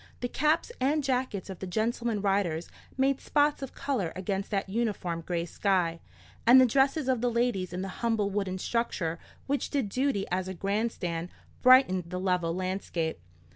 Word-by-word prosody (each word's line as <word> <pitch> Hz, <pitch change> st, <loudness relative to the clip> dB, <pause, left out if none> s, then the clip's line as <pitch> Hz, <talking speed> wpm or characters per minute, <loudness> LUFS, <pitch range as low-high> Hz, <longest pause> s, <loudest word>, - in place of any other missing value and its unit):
The 245 Hz, -, 0 dB
caps 305 Hz, -, +1 dB
and 290 Hz, +3 st, +2 dB
jackets 255 Hz, -7 st, -1 dB
of 190 Hz, -3 st, -7 dB
the 190 Hz, -, -5 dB
gentleman 225 Hz, +2 st, -1 dB
riders 190 Hz, -5 st, 0 dB, 0.3 s
made 270 Hz, 0 st, +2 dB
spots 295 Hz, -1 st, +2 dB
of 270 Hz, -, -6 dB
colour 220 Hz, -13 st, -1 dB
against 195 Hz, +1 st, -3 dB
that 200 Hz, -2 st, -1 dB
uniform 190 Hz, -6 st, -2 dB
grey 170 Hz, 0 st, -2 dB
sky; 175 Hz, -2 st, 0 dB, 0.5 s
and 250 Hz, +2 st, +9 dB
the 260 Hz, -, +7 dB
dresses 270 Hz, +4 st, +2 dB
of 255 Hz, -3 st, +1 dB
the 245 Hz, -, +2 dB
ladies 235 Hz, -6 st, 0 dB
in 180 Hz, +1 st, -3 dB
the -, -, -3 dB
humble 225 Hz, -4 st, +1 dB
wooden 195 Hz, -2 st, -1 dB
structure 185 Hz, -7 st, -1 dB, 0.3 s
which 280 Hz, 0 st, -1 dB
did 270 Hz, -8 st, -1 dB
duty 255 Hz, -3 st, 0 dB
as 185 Hz, +1 st, 0 dB
a 190 Hz, -, -5 dB
grand 205 Hz, +6 st, 0 dB
stand, 170 Hz, -3 st, -4 dB, 0.3 s
brightened 255 Hz, -9 st, +6 dB
the 180 Hz, -, -3 dB
level 180 Hz, -3 st, 0 dB
landscape. 185 Hz, -, -2 dB
200 Hz, 175 wpm, -29 LUFS, 185-255 Hz, 0.5 s, and